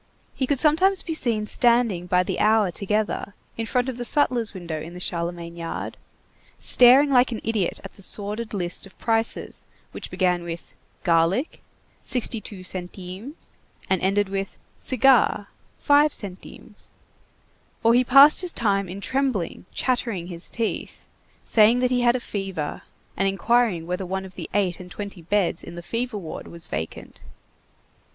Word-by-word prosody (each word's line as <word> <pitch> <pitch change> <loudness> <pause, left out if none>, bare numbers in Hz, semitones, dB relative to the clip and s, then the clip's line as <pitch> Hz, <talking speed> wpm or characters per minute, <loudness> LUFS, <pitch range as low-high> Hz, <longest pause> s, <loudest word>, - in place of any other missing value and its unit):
He 260 - -2
could 285 - +2
sometimes 350 +7 +4
be 330 - -3
seen 230 -8 +1
standing 235 -6 +2
by 180 0 +3
the - - -3
hour 215 -3 +3
together 205 +2 -2 0.2
in 225 -1 -3
front 250 +1 +1
of 260 -2 -4
the - - -2
sutler's 240 -4 +1
window 170 -5 -5
in 165 +3 -9
the - - -7
Charlemagne 170 -1 -4
yard, 165 -1 -5 0.6
staring 260 +4 +6
like 250 -1 +4
an 225 - -3
idiot 215 -5 -1
at - - -9
the - - -15
sordid 210 +3 -3
list 180 -1 -4
of 190 - -20
prices 225 0 -1 0.3
which - - -7
began 180 -2 +1
with: 170 0 -7 0.3
garlic, 170 - +1 0.4
62 215 -5 -3
centimes, 185 - -8 0.4
and 190 - +2
ended 195 +2 +2
with: 195 0 -4 0.2
cigar, 255 -6 +3 0.3
5 295 +1 +4
centimes. 190 -3 -10 0.9
Or 230 +1 +5
he 250 +1 +5
passed 275 +6 +7
his 360 -2 -3
time 200 -4 0
in 195 +3 -7
trembling, 260 -9 -1
chattering 230 -8 -1
his 170 -1 -5
teeth, 230 -2 -4 0.4
saying 220 +2 +5
that 250 0 +1
he 250 -1 +2
had 240 0 +4
a - - 0
fever, 195 -9 -4 0.3
and 195 - +1
inquiring 195 -3 +2
whether 180 +2 -3
one 190 +1 -3
of 190 - -11
the - - -7
eight 190 -4 +1
and 180 -1 -10
twenty 200 -1 -7
beds 180 0 0
in 170 - -9
the 175 - -8
fever 235 +3 -3
ward 170 -6 -7
was 170 -1 -7
vacant. 80 +1 -6
205 Hz, 160 wpm, -24 LUFS, 180-245 Hz, 0.9 s, passed